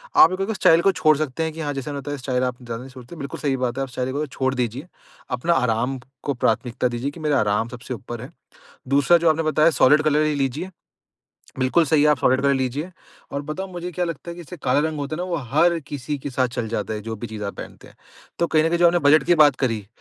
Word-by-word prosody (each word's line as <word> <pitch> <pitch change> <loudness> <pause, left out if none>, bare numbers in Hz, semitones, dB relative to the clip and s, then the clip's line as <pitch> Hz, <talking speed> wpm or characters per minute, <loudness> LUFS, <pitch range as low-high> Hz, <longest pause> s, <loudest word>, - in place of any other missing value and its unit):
आप 165 - +8
एक 185 - -4
उ- - - +1
उस - - -3
स्टाइल 165 -3 +5
को 195 - +4
छोड़ 155 -5 +3
सकते 155 0 -2
हैं 160 -1 -3
कि 160 - -10
हाँ, 145 -1 -2
जैसे 135 +2 -5
मैंने 140 -1 -5
बताया, 145 +1 -5
स्टाइल 125 -1 -1
आप 125 -1 -2
ज़्यादा 115 -1 -6
नहीं 130 +1 -11
सोचते। 130 +4 -11
बिल्कुल 140 -4 -7
सही 140 -3 0
बात 120 +1 -3
है, 135 - 0
आप 135 - -6
स्टाइल 130 +1 -3
को 150 +2 -1
छोड़ 130 0 -1
दीजिए। 125 +6 -3 0.5
अपना 170 +7 +1
आराम 125 -1 0 0.2
को 140 - -1
प्राथमिकता 120 +1 0
दीजिए 120 +4 -3
कि, 165 - -12
मेरा 150 -3 +1
आराम 105 +2 +1
सबसे 125 +1 -7
ऊपर 120 +1 -7
है। 130 +5 -9 0.6
दूसरा, 140 +5 +4
जो 170 -1 +3
आपने 160 +1 +1
बताया, 155 +1 +3
सॉलिड 150 +4 +6
कलर 155 0 +2
ही 155 - +1
लीजिए। 140 +6 -2 0.9
बिल्कुल 130 +6 +3
सही 150 0 +3
है, 150 - +5
आप 150 -2 +3
सॉलिड 130 +1 +3
कलर 140 0 +3
लीजिए 135 +6 -2 0.4
और 140 - -3
बताऊँ, 190 +5 -4
मुझे 175 0 -5
क्या 180 +2 -1
लगता 170 0 -6
है - - -6
कि 175 - -8
जैसे 180 +2 -10
काला 125 +1 +2
रंग 155 -1 -5
होता 145 +2 -3
है - - -6
ना, 180 - -2
वो 175 -2 -2 0.2
हर 170 +3 +4
किसी 145 +1 -4
के 140 - -6
साथ 130 -1 +1
चल 115 -2 -2
जाता 110 -1 -3
है, 105 - -4
जो 110 +1 -5
भी 120 - -6
चीज़ 110 -2 -6
आप 100 - -4
पहनते - - -10
हैं। - - -20 0.4
तो 170 - +2
कहीं 155 -1 +2
न - - +3
कहीं 170 +1 0
जो 175 - +6
आपने 175 +1 +4
बजट 145 -1 +6
की 175 - +4
बात 145 -3 +5
करी, 115 -7 -1
140 Hz, 275 wpm, -22 LUFS, 125-160 Hz, 0.9 s, आप